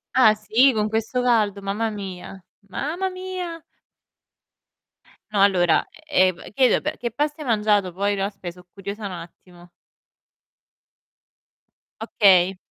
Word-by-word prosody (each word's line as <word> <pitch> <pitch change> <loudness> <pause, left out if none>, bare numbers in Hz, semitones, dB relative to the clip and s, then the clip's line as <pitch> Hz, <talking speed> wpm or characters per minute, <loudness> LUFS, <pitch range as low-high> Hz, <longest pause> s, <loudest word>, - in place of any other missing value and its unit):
Ah 220 -5 +6
sì, 225 +5 +3
con 215 0 0
questo 225 +3 -1
caldo, 215 -5 +2
mamma 210 +3 -1
mia. 195 -2 -8 0.3
Mamma 340 - -3
mia! 370 -3 -6 1.7
No 205 -2 +1
allora, 180 -4 +3 0.2
e 280 -12 +4
ehm, 180 -2 -5
chiedo 255 +3 +3
pe 305 +1 -3
che 240 - -3
pasta 295 +4 -2
hai 290 - -6
mangiato 210 -4 +2
poi? 200 +2 0
No 195 0 -1
aspe' 195 -3 -6
so' 180 0 -18
curiosa 200 +2 -7
un 195 - -7
attimo. 175 +1 -13 2.3
Okay. 190 -4 +4
210 Hz, 125 wpm, -23 LUFS, 190-250 Hz, 2.3 s, Ah